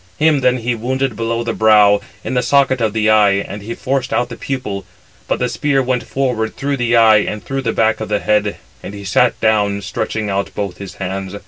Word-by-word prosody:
Him 155 -1 +3
then 125 -1 +2
he 120 0 -1
wounded 130 +2 -2
below 115 +1 -2
the 115 -1 -2
brow, 105 -2 +5 0.2
in - - -4
the 125 - +2
socket 130 -1 +2
of 110 -2 +1
the 110 0 +2
eye, 105 -2 +5
and 100 +1 -4
he 115 +3 -6
forced 135 -1 -2
out 120 0 0
the 115 - -7
pupil: 110 -7 -4 0.4
but - - 0
the 125 - 0
spear 140 +3 0
went 125 -1 -2
forward 125 -5 -1
through 140 0 -1
the 120 -1 +1
eye, 110 -2 +6
and 105 +1 -3
through 135 0 -3
the 115 -3 -1
back 110 0 +1
of 110 - -4
the 105 - +1
head; 105 -1 0 0.2
and 100 - -8
he 100 0 -9
sat 115 +6 +2
down, 105 -2 +1
stretching 105 +2 -3
out 100 0 -2
both 100 -3 -4
his 100 -2 -8
hands. 95 +1 -5
110 Hz, 225 wpm, -17 LUFS, 105-125 Hz, 0.4 s, eye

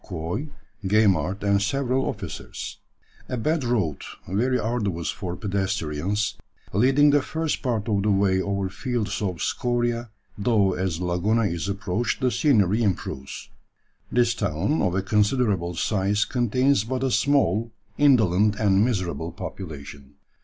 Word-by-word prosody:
Quoy, 90 - -4 0.3
Gaimard, 95 -2 +2
and 100 0 +3
several 130 +4 0
officers, 95 -6 -6 0.5
a 125 - -2
bad 155 +5 0
road, 105 - 0 0.3
very 120 +8 +1
arduous 105 -8 -1
for 90 -2 -5
pedestrians, 95 -1 -1 0.4
leading 135 +8 +5
the 145 0 +4
first 160 +2 -2
part 115 -5 -1
of 105 -3 +1
the 105 - +1
way 95 -1 +3
over 100 0 -1
fields 115 +3 -3
of 90 -6 -2
scoria, 120 -1 -1 0.3
though 100 -3 +3
as 90 -3 -2
Laguna 90 +6 +1
is 90 -1 -2
approached 100 +3 -1
the 130 -2 +1
scenery 110 - +3
improves. 80 - -3 0.6
This 120 -1 +3
town, 100 - 0
of 90 - +1
a 95 - 0
considerable 105 -4 +1
size, 105 +3 +1
contains 125 0 +2
but 130 +3 -3
a 135 - +1
small, 115 -2 +2 0.3
indolent, 110 -7 +4
and 100 -1 +3
miserable 95 -8 -1
population. 70 -2 -8
105 Hz, 130 wpm, -24 LUFS, 95-120 Hz, 0.6 s, leading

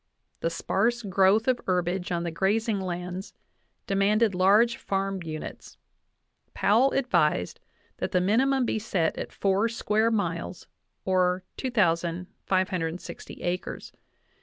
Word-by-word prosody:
The 165 - 0
sparse 230 +8 0
growth 195 +3 +3
of 255 -2 +2
herbage 180 0 0
on 170 -1 -1
the 170 - -3
grazing 205 +5 0
lands 180 +1 -5 0.5
demanded 205 +2 +2
large 205 +6 +4
farm 195 -1 -2
units; 155 -2 -7 0.8
Powell 235 +7 +4
advised 170 - +1 0.4
that - - -3
the 180 - +3
minimum 255 +8 +2
be 220 - -1
set 185 -7 0
at - - -5
four 200 +3 +1
square 220 -1 +1
miles, 175 -5 -2 0.4
or 185 -1 +2
2,560 180 -4 -2
acres. 180 +1 -4
190 Hz, 110 wpm, -27 LUFS, 180-220 Hz, 0.8 s, large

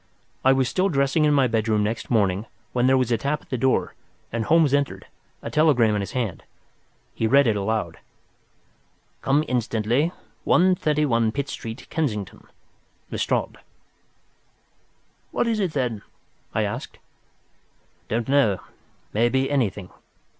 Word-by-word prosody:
I 130 - +6
was 130 -1 +2
still 185 +8 +1
dressing 140 0 +2
in 150 - +3
my 135 -2 +4
bedroom 110 -2 +1
next 110 +2 -3
morning, 105 -2 +1 0.3
when 125 0 +2
there 130 0 +5
was 125 -2 0
a 115 - +2
tap 145 +4 -2
at - - -25
the - - 0
door 130 +2 +1 0.4
and 115 -1 -2
Holmes 160 -1 +4
entered, 145 -1 0 0.4
a - - -5
telegram 140 -8 +4
in 105 - 0
his 100 - -6
hand. 115 -10 -2 0.7
He 110 - 0
read 140 +4 +5
it 110 -3 +2
aloud: 100 -4 -2 1.2
"Come 145 +3 +2
instantly, 120 +5 0 0.3
131, 150 -10 +2
Pitt 140 0 -3
Street, 115 +1 -7
Kensington.—LESTRADE." 110 - -4 1.7
"What - - 0
is 225 -2 0
it, 185 -6 -1
then?" 125 -6 -1 0.5
I - - +2
asked. - - -5 1.1
"Don't 115 +1 -2
know—may 120 -2 -1
be 135 +2 0
anything. 105 -9 -1
125 Hz, 130 wpm, -24 LUFS, 110-145 Hz, 1.7 s, I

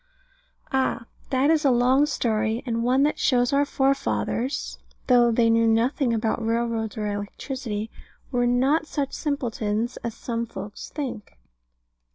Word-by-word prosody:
Ah, 260 -3 0 0.2
that 270 +3 +3
is 320 -1 +2
a 280 - +4
long 255 +4 +4
story; 225 -3 0
and 230 -2 -1
one 255 +3 +3
that 300 - +1
shows 245 -1 +2
our 285 +1 +3
forefathers 270 -1 -1 0.3
(though 240 -2 +5
they 230 0 +3
knew 230 0 +4
nothing 235 +4 +2
about 225 0 0
railroads 230 -1 -1
or 215 - -2
electricity) 210 +2 -4 0.4
were 245 -2 +1
not 270 +6 +2
such 285 -3 -3
simpletons 235 -5 -2
as 235 -1 -5
some 235 -1 -3
folks 200 0 -8
think. 255 -8 -6
240 Hz, 140 wpm, -25 LUFS, 225-270 Hz, 0.4 s, though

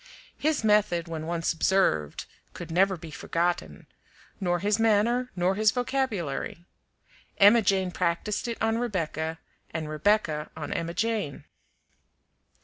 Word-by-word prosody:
His 305 -5 +1
method, 210 -6 +2
when 160 -1 -5
once 170 0 0
observed, 155 - +1 0.3
could - - -7
never 190 +2 +3
be 160 -1 -10
forgotten; 170 +3 -2 0.5
nor 175 -3 +1
his 205 +4 0
manner, 225 +3 +2
nor 180 +1 +2
his 215 +2 +3
vocabulary. 220 - -2 0.7
Emma 210 +4 +7
Jane 190 -2 +1
practiced 180 +6 -1
it 235 - -3
on 225 +1 +1
Rebecca, 165 -8 -2 0.3
and 160 -1 -4
Rebecca 155 -1 +1
on 150 - -4
Emma 170 +1 -3
Jane. 220 -10 -1
185 Hz, 125 wpm, -27 LUFS, 165-215 Hz, 0.7 s, Emma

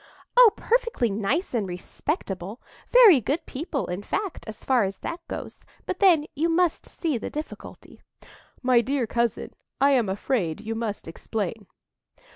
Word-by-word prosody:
"Oh, - - +9
perfectly 470 - +1
nice 225 - -1
and 220 -5 0
respectable,—very 245 - +2
good 290 +9 -2
people, 280 0 -3
in 180 +2 -4
fact, 385 - -4
so 215 - -15
far 255 -4 +3
as 195 0 -3
that 340 - -3
goes. - - -7 0.3
But 370 - -4
then 340 -6 +5
you 325 +4 0
must 345 0 +1
see 310 -8 -2
the - - -5
difficulty." 305 +1 -9 0.6
"My 250 -2 +5
dear 265 +1 -1
cousin, 235 0 -1 0.3
I 280 +1 +5
am 240 -7 +2
afraid 190 - -1
you 220 +1 -4
must 225 -5 -4
explain." 205 +4 -4
250 Hz, 145 wpm, -25 LUFS, 210-325 Hz, 0.6 s, Oh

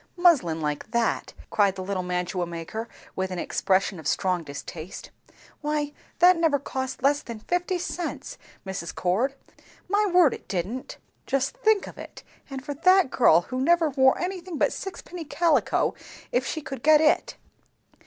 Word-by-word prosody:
"Muslin 275 - +4
like 150 +5 -3
that!" 235 0 -1 0.2
cried 200 -2 +3
the 190 - -5
little 190 0 -2
mantua 180 0 -2
maker 170 +7 -6 0.3
with 190 0 -1
an 185 - -5
expression 190 0 0
of 155 - -6
strong 185 +1 +1
distaste. 155 +4 -8 0.5
"Why 295 -1 -1 0.2
that 360 +1 +7
never 325 -4 +3
cost 260 -1 -5
less 285 +1 +3
than 235 -2 -7
fifty 355 - -1
cents, 350 -1 -5 0.3
Mrs. 190 -3 -5
Cord! 220 +10 0 0.5
My 410 +2 +2
word, 350 -6 +5
it - - -10
didn't." 195 +7 -4 0.3
"Just 275 - 0
think 440 -5 +3
of - - -11
it! - - -10 0.3
And 270 -1 -7
for 290 - -3
that 365 +1 +4
girl, 230 -8 +5
who 255 +8 -4
never 330 +1 +3
wore 265 -1 +4
anything 360 -2 -4
but - - +2
sixpenny 360 -3 -7
calico 330 +1 +1 0.4
if 255 +1 +1
she 315 - -3
could 270 -2 -6
get 305 +2 +6
it. 310 +1 +2
265 Hz, 160 wpm, -26 LUFS, -, 0.5 s, that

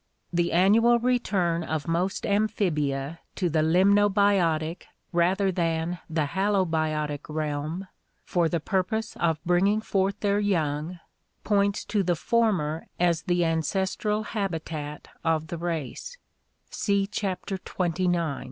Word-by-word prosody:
The 170 0 +1
annual 220 +7 +5
return 205 -9 +1
of 160 0 -3
most 175 +3 -1
amphibia 165 -8 0 0.2
to 180 -3 0
the 155 0 +2
limnobiotic 190 -2 +3 0.3
rather 190 +3 +2
than 165 0 -1
the 160 -2 0
halobiotic 155 -5 0
realm 155 +4 -3 0.4
for 170 -2 +1
the 170 - 0
purpose 200 +7 -1
of 165 -2 +1
bringing 190 +5 +3
forth 195 -2 0
their 205 -1 +2
young 165 -4 -1 0.4
points 200 0 +1
to 210 - 0
the 180 -2 +1
former 175 -7 0
as 170 -2 +2
the 175 0 +1
ancestral 190 +6 0
habitat 165 -8 -4 0.2
of 160 -1 0
the 170 - -4
race 170 - -4 0.5
(see 200 -1 +1
Chapter 195 -1 -3
XXIX). 175 -4 -1
175 Hz, 115 wpm, -26 LUFS, 160-200 Hz, 0.5 s, annual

